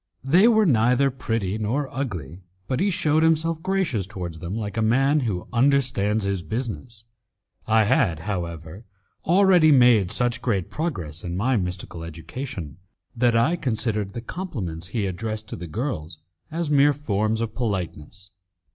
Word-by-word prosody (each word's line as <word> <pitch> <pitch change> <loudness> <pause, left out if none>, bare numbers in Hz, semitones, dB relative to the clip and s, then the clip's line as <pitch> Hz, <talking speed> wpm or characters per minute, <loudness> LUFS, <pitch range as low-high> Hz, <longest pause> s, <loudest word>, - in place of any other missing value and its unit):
They 175 - +5
were 220 -2 +4
neither 125 - +3
pretty 115 -5 -2
nor 125 +7 -1
ugly, 90 - -4 0.3
but 130 - -1
he 195 +3 +2
shewed 160 -5 +2
himself 160 0 +2
gracious 180 - -1
towards 90 -6 -6
them 90 +6 -4
like 105 -1 -4
a 110 - 0
man 135 +7 +3
who 105 -9 -3
understands 120 -5 +2
his 100 -2 -1
business. 115 +2 -5 0.6
I 110 0 +4
had, 100 - +2
however, 85 -1 -5 0.4
already 180 -3 +5
made 120 -8 +5
such 125 +3 0
great 100 -8 -1
progress 90 - -4
in 85 0 -4
my 125 +7 +1
mystical 90 -4 -3
education, 85 - -7 0.4
that 120 -1 +2
I 120 +9 +3
considered 110 - -2
the 120 - -5
compliments 105 - -5
he 105 +1 -2
addressed 110 +3 -4
to - - -4
the 85 - -7
girls 85 - -4 0.3
as 160 -1 -3
mere 145 0 +5
forms 110 -6 -1
of 115 -1 -3
politeness. 95 - -4
115 Hz, 150 wpm, -24 LUFS, 95-140 Hz, 0.6 s, They